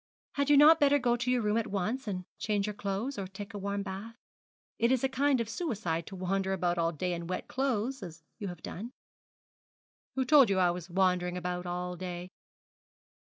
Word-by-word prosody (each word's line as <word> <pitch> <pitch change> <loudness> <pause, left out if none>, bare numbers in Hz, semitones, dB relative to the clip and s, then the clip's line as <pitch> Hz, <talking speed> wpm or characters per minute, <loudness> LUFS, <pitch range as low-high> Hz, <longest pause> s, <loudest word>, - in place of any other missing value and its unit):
'Had 280 0 0
you 290 - +7
not 310 +3 +8
better 285 0 +5
go 245 -3 +2
to 245 +1 -2
your 250 -2 +2
room 210 +1 +2
at 230 - 0
once 215 +7 -2
and 185 -3 -3
change 205 -1 0
your 210 - -3
clothes, 205 +7 -3
or 190 - -3
take 200 +3 -9
a 205 - -5
warm 200 0 -2
bath. 200 +4 -7 0.6
It 235 +2 +3
is 260 -1 +2
a - - +4
kind 270 0 +2
of 230 - -1
suicide 210 - -2
to 195 - -7
wander 190 +1 -1
about 175 -2 0
all 165 0 +2
day 180 +3 -2
in 170 -1 -5
wet 185 - -3
clothes 260 -1 -1
as 165 -3 -9 0.2
you 205 - -4
have 175 -3 -8
done.' 230 +8 -6 1.2
'Who 260 -1 +1
told 275 -3 +7
you 195 - +2
I 180 -2 +4
was 175 0 -6
wandering 180 -1 +1
about 180 0 -3
all 180 0 -3
day?' 180 0 -6
200 Hz, 205 wpm, -30 LUFS, 180-245 Hz, 1.2 s, not